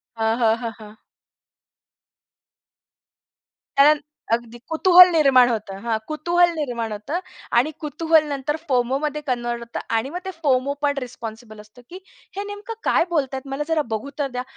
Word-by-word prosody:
हां, 225 +1 0
हां. 225 -2 +4
हां, 230 -2 -3
हां. 215 0 -13 2.8
कारण, 295 +1 +6 0.3
अगदी 235 0 -2
कुतूहल 360 +2 +8
निर्माण 260 -5 +5
होतं. 210 -4 -3
हां, 225 -2 +1
कुतूहल 345 +3 +2
निर्माण 235 -6 -3
होतं 240 - -3 0.4
आणि 285 +6 +3
कुतूहल 320 +1 +2
नंतर 280 +2 -2
फोमोमध्ये 270 +4 0
कन्व्हर्ट 240 -1 -2
होतं 235 0 -6 0.2
आणि 230 +5 0
मग 355 +3 -5
ते 380 - -3
फोमो 270 0 +2
पण 285 -1 +1
रिस्पॉन्सिबल 225 -2 -9
असतं, 215 +4 -18
"की 365 +2 -9 0.4
हे 400 - -2
नेमकं 410 +2 -7
काय - - +3
बोलतायेत, 275 -4 -2
मला 285 +2 -2
जरा 325 -2 +1
बघू 220 +6 -4
तर 280 - +1
द्या." 250 - -2
270 Hz, 150 wpm, -22 LUFS, 235-305 Hz, 2.8 s, कुतूहल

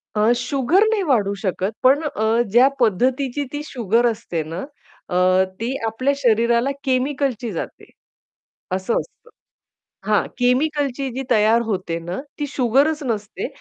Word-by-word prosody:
अ, 215 +2 +3
sugar 270 - +2
नाही 425 -3 +1
वाढू 220 - +1
शकत 190 0 -1
पण 270 +4 +5
अ, 230 -5 +1
ज्या 245 +4 +6
पद्धतीची 255 +5 +1
ती 290 - -3
शुगर 235 -3 0
असते 210 -8 -4
ना, 165 +4 -6 0.5
अ, 185 +1 +3 0.2
ती 240 +4 -2
आपल्या 255 +6 0
शरीराला 235 +1 +2
केमिकलची 260 -3 -1
जाते. 170 - -7 0.8
असं 190 +5 0
असतं. 475 - -12 0.8
हां, - - +2
केमिकलची 275 +1 +1
जी 265 +3 -4
तयार 220 +1 +4
होते 185 -6 -2
ना, 175 +5 -5 0.2
ती 295 - -2
शुगरच 280 +4 +1
नसते 215 -4 -3
240 Hz, 130 wpm, -21 LUFS, 210-275 Hz, 0.8 s, ज्या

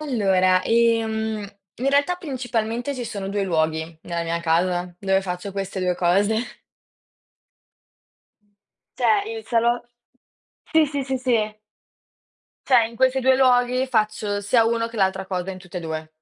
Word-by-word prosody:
Allora, 190 -9 +2
ehm, 225 -2 +1 0.4
in 260 +3 -1
realtà, 285 +6 +2
principalmente, 245 -3 -3
ci 250 - -5
sono 200 -4 -5
2 200 0 -1
luoghi 160 -1 -1
nella 170 -1 -3
mia 170 0 -2
casa, 175 +1 0
dove 190 0 +1
faccio 180 +1 -5
queste 195 -1 -4
2 180 -1 +1
cose. 200 +6 +2 2.6
Cioè, 410 -2 +2
il 445 - -9
salo 235 0 +1 0.9
sì, 320 -1 +5
sì, 280 -1 -3
sì, 265 0 -2
sì. 230 -4 0 1.1
Cioè 245 -4 +5
in 230 - -14
questi 260 +1 +2
2 260 0 +4
luoghi, 255 0 +3
faccio 215 -3 0
sia 225 +4 +3
uno 230 0 0
che 230 - -11
l'altra 190 -1 +1
cosa, 185 0 -3
in 185 - -8
tutti 180 -1 -9
e - - -2
2. 160 -1 -5
215 Hz, 145 wpm, -23 LUFS, 185-245 Hz, 2.6 s, sì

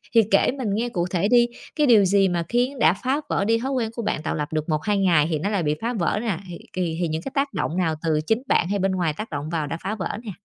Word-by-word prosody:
Thì 225 - +8
kể - - +4
mình 250 -5 -3
nghe 235 +3 -1
cụ 175 -4 -1
thể 185 +2 +1
đi, 240 0 +5 0.3
cái 300 -2 +2
điều 215 -5 +6
gì 195 +1 +4
mà 170 -1 -1
khiến 250 +3 0
đã 160 -3 +5
phá 265 +8 -1
vỡ 200 - 0
đi 230 +1 +2
thói 265 +3 -3
quen 240 -4 0
của 235 - -3
bạn, 210 -7 -2
tạo - - -2
lập 150 +1 -4
được 155 +1 -2
1-2 160 +7 0
ngày 170 -6 +3
thì 155 -2 -1
nó 200 +6 -1
lại 200 -5 0
bị 150 0 +1
phá 235 +2 -1
vỡ 205 0 0
nè? 215 -8 -1
Thì 175 -1 -7 0.2
thì 170 -3 -2
thì 170 - +1
những 160 +1 -3
cái 270 - -6
tác 275 0 0
động 170 - -2
nào, 165 -4 +1
từ 155 -2 +1
chính 225 +4 +1
bạn 170 - +2
hay 200 0 0
bên 195 0 +1
ngoài 175 -5 0
tác 215 - -5
động 145 +1 -4
vào 160 -3 -2
đã 165 - -4
phá 205 +3 -2
vỡ 200 0 -4
nè? 210 - -4
195 Hz, 305 wpm, -23 LUFS, 165-230 Hz, 0.3 s, Thì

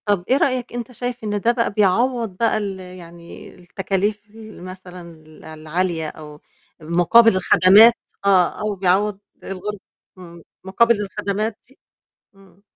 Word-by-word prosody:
طَب 205 -4 0
إيه 260 - +4
رأيك 255 -4 -1
أنت 240 0 -6
شايف 245 0 -6
إن 210 -1 -2
ده 235 - +3
بقى 235 -2 -1
بيعوّض 220 +1 0
بقى 230 0 +1
ال 200 -3 -4
يعني 175 -2 -12
التكاليف 195 +3 -3 0.4
مثلًا 185 0 -10
ال 155 0 -18
العالية 160 +1 -3
أو 150 -1 -13 0.4
مقابل 175 +8 +4
الخدمات 195 +5 +6 0.3
آه، 185 -3 +2
أو 210 -1 -2
بيعوّض 195 +2 0 0.2
الغُر 195 +2 -6 0.4
إمم، 170 -2 -13 0.2
مقابل 210 +3 +2
الخدمات 210 +2 -3
دي؟ 265 - -25 0.6
إمم. 195 0 -23
195 Hz, 130 wpm, -20 LUFS, 180-215 Hz, 0.6 s, الخدمات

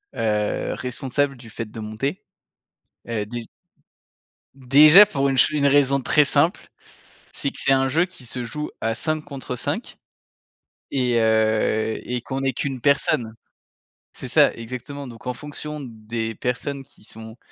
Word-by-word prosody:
heu, 105 -2 -1
responsable 135 +2 -2
du 120 -2 -13
fait 115 - -5
de 115 - -8
monter, 110 - -4 0.8
heu, 110 -3 -2
déj 120 +1 -6 1.1
déjà 150 +8 +8
pour 140 -8 0
une 135 - -1
ch - - +6
une 150 -2 0
raison 140 -1 +4
très 150 +3 +3
simple, 155 +6 +1 0.6
c'est 140 - -1
que - - -9
c'est - - +3
un 135 0 +3
jeu 165 +6 +2
qui 180 -8 -13
se 125 +1 -5
joue 150 +5 -5
à 115 0 0
5 155 +5 -2
contre 140 -4 -6
5 125 - -4 0.9
et 125 -3 +1
heu, 110 0 +1
et 125 0 -2
qu'on 135 +2 -4
est 135 -1 +1
qu'1 130 0 -4
personne. 140 -4 +1 0.8
C'est - - -9
ça, - - +5
exactement, 130 +5 -7
donc 120 +1 -11
en 125 - -2
fonction 150 +1 -7
des 115 -2 -5
personnes 125 +5 -3
qui 135 -5 -21
sont 110 +1 -11
130 Hz, 155 wpm, -23 LUFS, 115-140 Hz, 1.1 s, déjà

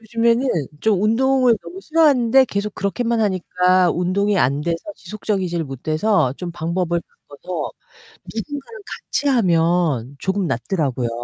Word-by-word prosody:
요즘에는 230 +3 +1 0.3
좀 215 -4 +2
운동을 250 +2 +3
너무 380 - -9
싫어하는데 275 -7 +4
계속 200 -1 -3
그렇게만 230 +3 -1
하니까 185 -2 +2
운동이 195 +3 +1
안 140 0 +2
돼서 165 +2 -1 0.2
지속적이지를 190 -6 -3
못해서 155 - 0
좀 180 -1 -5
방법을 170 +1 -1
바꿔서 170 +3 -7 0.6
누군가랑 290 - -6 0.3
같이하면 170 - +1
조금 190 -1 -1
낫더라고요. 135 -2 -1
190 Hz, 325 characters per minute, -20 LUFS, 170-230 Hz, 0.6 s, 싫어하는데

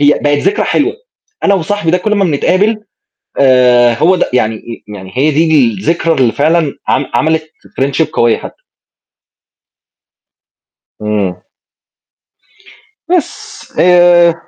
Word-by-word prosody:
هي 145 0 +4
بقِت 145 0 +1
ذكرى 195 +6 0
حلوة، - - 0 0.5
أنا 200 - +3
وصاحبي 185 -1 -2
ده 180 - +2
كلّ 210 +3 -1
ما 200 -1 +1
بنتقابل 190 +7 0 0.6
آآ 125 -3 +4
هو 180 +8 +2
ده - - -1
يعني 115 -1 -3
يعني 95 -1 -10
هي 145 +4 +2
دي 155 -3 +3
الذكرى 165 - -1
اللي 125 -4 +2
فعلًا 155 0 +1
عم 135 - 0
عملِت 160 0 0 0.4
Friendship 140 +4 0
قوية 120 -1 +2
حتّى. - - -10 2.5
إمم. 105 -4 -2 1.7
بس، 355 -4 -3
آآ 175 -1 +5
155 Hz, 115 wpm, -12 LUFS, 125-175 Hz, 2.5 s, آآ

